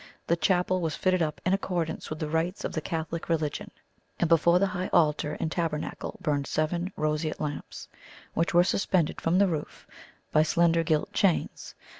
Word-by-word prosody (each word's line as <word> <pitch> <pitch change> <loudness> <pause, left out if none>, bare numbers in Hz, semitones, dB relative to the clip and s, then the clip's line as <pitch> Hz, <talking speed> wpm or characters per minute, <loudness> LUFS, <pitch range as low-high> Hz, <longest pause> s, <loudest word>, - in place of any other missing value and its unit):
The 170 - +2
chapel 180 +1 +1
was 160 -2 -1
fitted 185 -1 +1
up 155 -2 -1
in 185 - +3
accordance 180 -4 -2
with 155 - -4
the 155 - -3
rites 165 +4 -1
of - - -2
the 155 - -2
Catholic 165 +1 -4
religion, 155 -3 -1 0.5
and 170 - +2
before 170 +1 +5
the 195 - +3
High 180 +1 -2
Altar 150 -2 +2
and 160 - -2
Tabernacle 160 -3 -3
burned 145 -4 0
seven 170 +4 -1
roseate 155 +1 -1
lamps, 150 -1 -5 0.5
which 165 - +1
were 175 0 +6
suspended 180 -3 0
from 165 +2 +2
the 200 +1 +5
roof 155 -4 -4 0.5
by 155 - +5
slender 170 +1 +3
gilt 155 -1 0
chains. 190 -5 0
165 Hz, 175 wpm, -28 LUFS, 155-175 Hz, 0.5 s, were